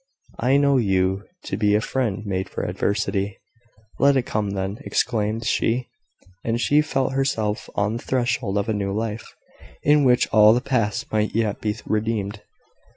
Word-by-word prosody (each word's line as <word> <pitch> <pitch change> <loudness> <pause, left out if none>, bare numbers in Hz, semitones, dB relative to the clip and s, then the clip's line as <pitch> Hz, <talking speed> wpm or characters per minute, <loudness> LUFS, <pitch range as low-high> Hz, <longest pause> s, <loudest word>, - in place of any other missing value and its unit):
"I 130 +4 +3
know 140 -1 +4
you 95 -3 +1 0.2
to 95 - -4
be 105 -1 +3
a - - +4
friend 110 -3 -2
made 95 -1 -2
for - - -4
adversity." 100 -1 -1 0.6
"Let 140 0 +5
it 130 - +1
come, 105 -3 -2
then!" 100 +1 -3
exclaimed 110 -1 -1
she. 120 +3 0 0.5
And 115 +1 -1
she 145 +4 +4
felt 135 -3 -1
herself 125 -6 -1
on 105 +3 0
the - - -9
threshold 120 -5 0
of 100 - 0
a 110 - 0
new 100 -1 -2
life, 110 +1 -4 0.5
in 150 0 +4
which 125 -2 +4
all 110 0 +7
the - - +2
past 115 -6 -1
might 110 0 0
yet 110 -3 0
be 105 -1 -1
redeemed. 110 -1 -2
110 Hz, 165 wpm, -23 LUFS, 105-125 Hz, 0.6 s, all